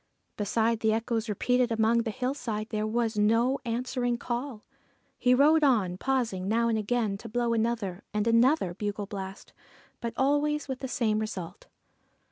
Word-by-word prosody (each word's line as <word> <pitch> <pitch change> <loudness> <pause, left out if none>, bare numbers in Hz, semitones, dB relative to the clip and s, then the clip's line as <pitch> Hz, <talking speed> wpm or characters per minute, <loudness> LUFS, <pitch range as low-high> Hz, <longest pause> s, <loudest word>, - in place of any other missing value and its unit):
Beside 225 +2 0
the 220 -1 +2
echoes 225 0 -1
repeated 250 +4 +1
among 225 +1 +3
the 230 -1 -1
hillsides, 230 -3 -3
there 215 -1 -1
was 225 -1 0
no 230 +6 +3
answering 245 +1 -1
call. 240 -1 -4 0.6
He 250 0 +4
rode 305 +4 +5
on, 200 -10 +2
pausing 235 -9 -1
now 230 +2 +2
and 225 - +1
again 215 -2 -1
to 230 - -9
blow 240 +1 0
another 225 -5 -1
and 210 0 -1
another 230 - +3
bugle 205 +1 -3
blast, 195 -1 -8 0.5
but 230 -1 -4
always 290 +2 +1
with 265 -2 -4
the 265 - -4
same 220 -4 0
result. 200 -6 -6
230 Hz, 155 wpm, -28 LUFS, 215-250 Hz, 0.6 s, rode